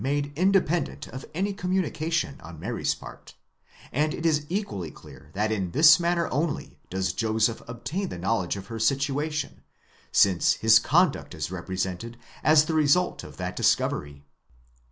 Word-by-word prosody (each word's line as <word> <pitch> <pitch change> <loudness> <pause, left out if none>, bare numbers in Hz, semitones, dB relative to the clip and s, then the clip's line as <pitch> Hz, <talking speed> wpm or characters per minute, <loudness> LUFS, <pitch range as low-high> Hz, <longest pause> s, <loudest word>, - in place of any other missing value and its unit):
123. 145 +1 -1
made - - -21
independent 180 -1 +1
of 130 +3 -8
any 200 +3 0
communication 170 -5 -1
on 80 -1 -11
Mary's - - -1
part, - - -12 0.6
and 150 +3 0
it 165 - -6
is 150 -2 +2
equally 170 - -3
clear 70 -2 -15
that 105 +2 0
in 95 -4 -1
this 155 +2 +7
manner 170 -1 +1
only 150 +4 -2
does 95 -3 -1
Joseph 110 0 0
obtain 155 +12 -4
the - - -6
knowledge 90 0 -1
of 100 -1 -7
her 115 +2 -7
situation, 140 +4 -1 0.5
since 95 -4 +4
his - - +5
conduct - - +1
is 80 +2 -4
represented 95 +5 -4 0.3
as 155 0 +6
the 160 - -2
result 155 +3 +2
of - - -11
that - - -4
discovery 70 -1 0
(εὑρίσκεσθαι). - - -35
135 Hz, 155 wpm, -26 LUFS, -, 0.6 s, this